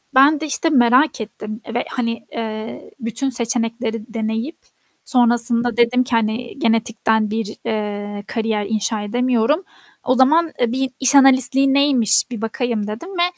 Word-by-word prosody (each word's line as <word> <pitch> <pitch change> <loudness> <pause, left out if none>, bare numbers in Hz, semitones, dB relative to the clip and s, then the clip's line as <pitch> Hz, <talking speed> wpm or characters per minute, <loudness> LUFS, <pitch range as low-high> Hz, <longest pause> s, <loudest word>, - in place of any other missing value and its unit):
ben 285 +3 +5
de, 315 - -4
işte, 320 +2 0
merak 255 0 +3
ettim 215 +1 -8
ve, 240 - -2
hani, 230 -2 -4
eee, 220 -1 -7
bütün 235 +4 -2
seçenekleri 230 -2 -2
deneyip 225 +6 -4 0.5
sonrasında 240 -1 +3
dedim 240 +1 +2
ki 250 - -10
hani 230 +4 -2
genetikten 225 -2 0
bir, 220 -1 -4
eee, 205 -1 -4
kariyer 220 -2 -2
inşa 215 0 -2
edemiyorum. 245 - 0 0.4
O 255 - +1
zaman, 310 +5 +3
eee, 240 -2 0
bir 265 +1 -1
iş 270 +1 +3
analistliği 270 0 +5
neymiş 265 -6 +4
bir 230 -3 -6
bakayım 225 -1 -3
dedim 220 - -7
ve 360 -3 -1
235 Hz, 145 wpm, -19 LUFS, 220-260 Hz, 0.5 s, ben